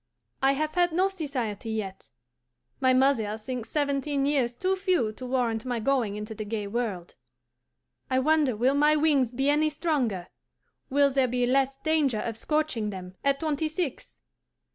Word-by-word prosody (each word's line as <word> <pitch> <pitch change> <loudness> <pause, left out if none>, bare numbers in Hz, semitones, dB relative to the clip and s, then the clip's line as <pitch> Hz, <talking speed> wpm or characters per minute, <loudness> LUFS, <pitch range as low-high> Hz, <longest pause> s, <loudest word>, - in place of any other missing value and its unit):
I 270 +1 +4
have 305 +2 -2
had 350 -1 +3
no 375 +3 +3
society 255 - -4
yet. 210 -4 -4 0.7
My 260 -1 +4
mother 255 -5 +2
thinks 235 +1 -6
seventeen 285 -1 0
years 265 -5 +1
too 375 +8 0
few 365 - +1
to 255 +4 -8
warrant 240 -3 0
my 245 -2 -2
going 230 -4 0
into 210 +1 -6
the 215 - -5
gay 210 0 -3
world. 200 -5 -3 0.9
I 260 - +1
wonder 290 -2 +3
will 250 +5 +2
my 295 +2 +4
wings 290 -6 +3
be 270 +3 -1
any 305 +1 +2
stronger, 275 - -1 0.6
will 280 +1 +3
there 265 -1 +2
be 245 0 0
less 270 +1 +1
danger 300 -6 +1
of 230 0 -3
scorching 300 -5 -1
them 185 -2 -7
at 280 +1 +1
twenty 310 -1 0
six? 310 -3 -4
265 Hz, 165 wpm, -27 LUFS, 225-300 Hz, 0.9 s, I